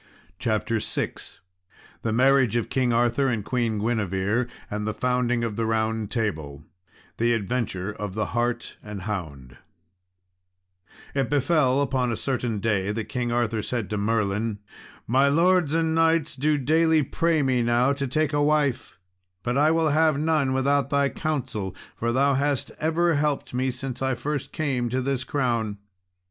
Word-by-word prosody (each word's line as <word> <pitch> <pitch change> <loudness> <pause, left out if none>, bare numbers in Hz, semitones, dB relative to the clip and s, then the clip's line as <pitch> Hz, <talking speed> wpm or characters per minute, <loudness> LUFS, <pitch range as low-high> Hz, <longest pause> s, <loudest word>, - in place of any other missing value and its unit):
CHAPTER 110 -1 0
VI - - -1 0.9
The 115 - -1
Marriage 130 -1 +4
of 120 - 0
King 130 -2 +1
Arthur 120 +3 +2
and 115 -5 -1
Queen 120 -4 0
Guinevere, 105 +1 0 0.2
and 105 0 -4
the 110 - -2
Founding 125 -1 0
of 110 -3 -3
the 115 -1 0
Round 110 -1 0
Table 80 - -3 0.5
The 120 +1 +2
Adventure 105 -3 -2
of 105 -2 -6
the 110 -1 0
Hart 120 0 -1
and 105 -3 -7
Hound 70 - -5 1.6
It 135 -3 0
befell 140 -1 +2
upon 130 -3 0
a 115 - -2
certain 125 -4 -2
day, 105 -2 0
that 110 0 -4
King 120 -1 -2
Arthur 115 -2 0
said 115 -1 -3
to 105 - -1
Merlin, 105 0 0 0.5
"My 135 +4 +3
lords 165 +1 +3
and 165 -1 +1
knights 165 -2 +2
do 150 +3 +1
daily 160 +3 +3
pray 160 +2 +1
me 130 -2 +2
now 120 +3 +3
to 140 -1 -2
take 155 +3 0
a 145 - +2
wife; 145 -3 +1 0.5
but 120 0 -1
I 150 +3 +4
will 160 -1 +2
have 155 0 +3
none 155 -3 +1
without 140 +1 +1
thy 140 -1 +2
counsel, 130 - -3 0.2
for 115 +1 -1
thou 140 +3 +3
hast 140 0 0
ever 165 +2 +2
helped 145 -3 -1
me 130 +1 0
since 130 0 -5
I 130 -1 +1
came - - -15
first 145 -2 -4
to 130 -4 -1
this 135 -1 -1
crown." 120 -7 -1
125 Hz, 160 wpm, -25 LUFS, 110-140 Hz, 1.6 s, Marriage